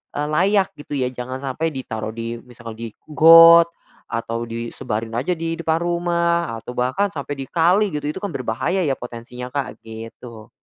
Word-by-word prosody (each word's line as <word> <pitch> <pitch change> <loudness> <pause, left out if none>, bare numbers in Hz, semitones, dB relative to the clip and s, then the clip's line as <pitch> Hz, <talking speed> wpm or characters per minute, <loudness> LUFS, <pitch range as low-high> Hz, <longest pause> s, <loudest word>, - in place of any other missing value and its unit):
eee, 145 +1 -1
layak 195 +5 +2
gitu 145 - -9
ya. 125 -1 0
Jangan 125 +1 -5
sampai 140 +4 -2
ditaruh 110 -4 -5
di 115 0 -4
misalkan, 120 -2 -10
di 115 0 -6 0.2
got 165 +2 +9 0.4
atau 115 0 -3
disebarin 115 -1 -4
aja 175 +8 0
di 165 0 -3
depan 160 -1 +1
rumah 170 -4 0
atau 125 - -8
bahkan 130 +12 +1
sampai 145 -1 -5
di 135 - -5
kali 180 +5 +3
gitu 150 -1 -3
itu - - -6
kan 200 - -2
berbahaya 130 +8 -1
ya 135 -2 +1
potensinya, 120 +1 -8
Kak, 140 -5 -4
gitu. 110 0 -10
135 Hz, 170 wpm, -21 LUFS, 115-165 Hz, 0.4 s, got